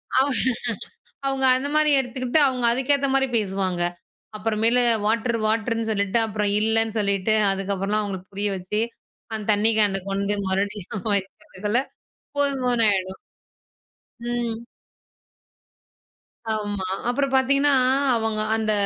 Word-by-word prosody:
அவ 265 Hz, +2 st, +4 dB, 1.0 s
அவங்க 270 Hz, -1 st, 0 dB
அந்த 275 Hz, +2 st, -3 dB
மாரி 305 Hz, 0 st, +4 dB
எடுத்துக்கிட்டு 255 Hz, +2 st, 0 dB
அவங்க 255 Hz, -2 st, -3 dB
அதுக்கேத்த 275 Hz, +3 st, +2 dB
மாரி 270 Hz, 0 st, +2 dB
பேசுவாங்க. 190 Hz, -4 st, -1 dB, 0.5 s
அப்புற 215 Hz, +1 st, -2 dB
மேலு 240 Hz, +2 st, +4 dB, 0.2 s
வாட்டர் 230 Hz, +2 st, 0 dB
வாட்டருன்னு 225 Hz, +1 st, -1 dB
சொல்லிட்டு, 200 Hz, +1 st, +1 dB
அப்புறம் 210 Hz, -1 st, -1 dB
இல்லன்னு 225 Hz, +1 st, +1 dB
சொல்லிட்டு 200 Hz, 0 st, +1 dB, 0.2 s
அதுக்கப்புறலாம் 195 Hz, +2 st, -1 dB
அவங்களுக்கு 190 Hz, -3 st, -6 dB
புரிய 205 Hz, +1 st, -1 dB
வச்சு, 190 Hz, +4 st, -2 dB, 0.5 s
அந்த 215 Hz, -1 st, -3 dB
தண்ணி 210 Hz, +2 st, +3 dB
கேன 195 Hz, -2 st, +3 dB
கொண்டு 200 Hz, +1 st, 0 dB
மறுபடியும் 195 Hz, 0 st, -3 dB
வைக்கிறதுக்குள்ள 200 Hz, +3 st, -3 dB, 0.6 s
போதும் 280 Hz, -2 st, +1 dB
போதுன்னு 240 Hz, -2 st, +3 dB
ஆயிடும். 190 Hz, -1 st, -3 dB, 1.1 s
ம். 240 Hz, -2 st, -2 dB, 2.0 s
ஆமா. 205 Hz, -3 st, -3 dB, 0.2 s
அப்புறம் 275 Hz, +2 st, 0 dB
பார்த்தீங்கன்னா, 275 Hz, +2 st, +3 dB, 0.4 s
அவங்க 220 Hz, -1 st, 0 dB
அந்த 220 Hz, -1 st, 0 dB
220 Hz, 115 wpm, -23 LUFS, 200-245 Hz, 2.0 s, அவ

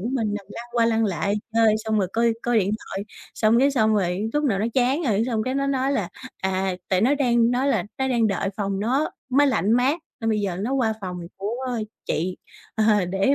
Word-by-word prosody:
của 220 Hz, -, -3 dB
mình, 220 Hz, -5 st, 0 dB
nằm 200 Hz, -2 st, -6 dB
lăn 235 Hz, -, -8 dB
qua 235 Hz, -1 st, +3 dB
lăn 225 Hz, -1 st, +2 dB
lại 200 Hz, +1 st, 0 dB, 0.2 s
chơi 225 Hz, -1 st, +4 dB
xong 220 Hz, -1 st, +1 dB
rồi 190 Hz, -3 st, +1 dB
coi 230 Hz, 0 st, +2 dB
coi 240 Hz, -1 st, +2 dB
điện 200 Hz, -1 st, +1 dB, 0.2 s
thoại, 195 Hz, -, -4 dB, 0.3 s
xong 220 Hz, +1 st, +3 dB
cái 275 Hz, +3 st, +4 dB
xong 220 Hz, -5 st, +2 dB
rồi 195 Hz, +2 st, 0 dB
lúc 295 Hz, 0 st, 0 dB
nào 220 Hz, -9 st, +1 dB
nó 210 Hz, -, 0 dB
chán 265 Hz, +6 st, +2 dB
rồi, 220 Hz, -6 st, +1 dB
xong 225 Hz, -4 st, 0 dB
cái 255 Hz, +3 st, -2 dB
nó 275 Hz, 0 st, 0 dB
nói 270 Hz, 0 st, +1 dB
là, 205 Hz, -10 st, -1 dB, 0.3 s
à, 190 Hz, 0 st, 0 dB
tại 185 Hz, -1 st, +2 dB
nó 250 Hz, +7 st, +4 dB
đang 240 Hz, -4 st, +3 dB
nói 255 Hz, +3 st, +1 dB
là 225 Hz, -9 st, +2 dB, 0.2 s
nó 265 Hz, 0 st, 0 dB
đang 235 Hz, -3 st, +2 dB
đợi 195 Hz, -1 st, -1 dB
phòng 195 Hz, -2 st, -2 dB
nó 260 Hz, +8 st, +1 dB, 0.2 s
máy 285 Hz, +3 st, +4 dB
lạnh 220 Hz, -5 st, +2 dB
mát 260 Hz, +7 st, +2 dB, 0.2 s
nên 225 Hz, -1 st, 0 dB
bây 215 Hz, -1 st, +1 dB
giờ 190 Hz, -3 st, -2 dB
nó 230 Hz, +6 st, -2 dB
qua 250 Hz, -5 st, +2 dB
phòng 180 Hz, -2 st, -5 dB, 0.2 s
của 205 Hz, +4 st, -3 dB, 0.5 s
chị, 180 Hz, +4 st, -1 dB, 0.4 s
ờ, 215 Hz, -3 st, +3 dB
để 195 Hz, +9 st, +2 dB
225 Hz, 235 wpm, -24 LUFS, 200-255 Hz, 0.5 s, chơi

